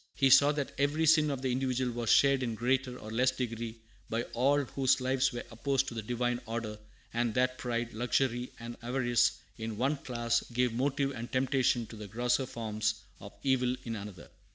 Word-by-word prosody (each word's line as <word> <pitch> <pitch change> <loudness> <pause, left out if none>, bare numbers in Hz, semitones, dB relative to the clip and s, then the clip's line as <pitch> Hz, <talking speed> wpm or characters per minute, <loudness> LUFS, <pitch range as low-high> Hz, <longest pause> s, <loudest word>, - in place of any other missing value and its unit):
He 135 -1 +3
saw 145 +3 +7
that 145 -2 -3
every 145 +3 +2
sin 155 -1 +5
of 135 -2 -3
the 130 - +1
individual 130 -1 0
was 120 -1 -3
shared 140 -1 +5
in 120 -3 -2
greater 125 +2 0
or 110 - -9
less 125 +3 +3
degree 115 -3 -4 0.3
by 115 +1 -1
all 140 +4 +3
whose 135 0 +1
lives 130 +1 +1
were 120 - -5
opposed 135 +3 0
to - - -9
the 115 - -3
Divine 120 +2 -1
order, 110 -2 -4 0.3
and 120 -1 0
that 125 0 +1
pride, 120 -1 -2
luxury, 125 +1 0
and 120 0 -7
avarice 120 -1 +2 0.3
in 110 -1 -4
one 135 +5 +1
class 120 -3 -1
gave 125 0 +1
motive 135 +2 0
and 120 -2 -7
temptation 130 -2 +2
to 110 - -11
the 105 -1 -8
grosser 125 +5 0
forms 110 -2 -2 0.2
of 100 +1 -10
evil 130 -2 +2
in 115 -1 -4
another. 100 -4 -9
125 Hz, 190 wpm, -31 LUFS, 115-135 Hz, 0.3 s, saw